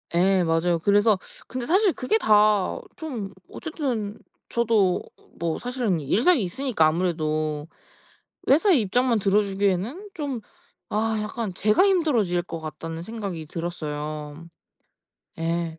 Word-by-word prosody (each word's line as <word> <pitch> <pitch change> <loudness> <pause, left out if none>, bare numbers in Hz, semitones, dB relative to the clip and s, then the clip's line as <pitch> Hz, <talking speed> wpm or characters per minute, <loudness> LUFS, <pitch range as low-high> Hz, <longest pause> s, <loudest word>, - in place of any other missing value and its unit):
예 185 +1 +4
맞아요. 165 +1 +1
그래서 205 +3 +3 0.3
근데 255 -1 -4
사실 385 +1 +4
그게 265 +13 +1
다 210 - +3 0.2
좀 240 -12 -5 0.2
어쨌든 250 - -3 0.3
저도 220 -6 +2 0.4
뭐 165 -1 -2
사실은 245 -8 -1
일상이 235 - +3
있으니까 195 - +1
아무래도 155 -3 -1 0.8
회사의 315 - +5
입장만 235 +3 +2
들어주기에는 200 - 0
좀 280 -8 -4 0.5
아 220 +1 0
약간 210 -1 -4
제가 210 - +3
힘들어질 265 - +2
것 165 -1 -6
같다는 160 +1 -6
생각이 195 -5 -5
들었어요. 155 -2 -5 0.9
예. 165 0 -2
200 Hz, 260 characters per minute, -25 LUFS, 170-245 Hz, 0.9 s, 회사의